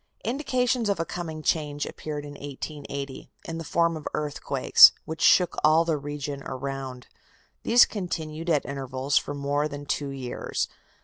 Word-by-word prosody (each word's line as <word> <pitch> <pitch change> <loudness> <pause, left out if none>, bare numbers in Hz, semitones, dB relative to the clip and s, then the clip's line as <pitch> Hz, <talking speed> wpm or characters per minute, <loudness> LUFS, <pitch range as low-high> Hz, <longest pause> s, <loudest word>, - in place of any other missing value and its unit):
Indications 250 -2 0
of 200 - 0
a 165 - 0
coming 160 -3 -6
change 145 -2 0
appeared 150 -1 -6
in 145 - -8
1880, 140 -1 -7 0.2
in 165 0 -4
the - - -5
form 170 +1 +1
of 155 - -6
earthquakes, 150 -1 +6
which 160 0 -6
shook 180 -2 +5
all 155 +2 +5
the 165 -2 +1
region 145 -1 -5
around. 130 -1 -5 0.6
These 240 +1 +6
continued 165 -4 -4
at 150 -4 +2
intervals 135 0 0
for 145 - -6
more 145 +1 0
that 145 -1 -8
two 145 -1 -1
years. 130 -3 -3
150 Hz, 150 wpm, -26 LUFS, 140-165 Hz, 0.6 s, earthquakes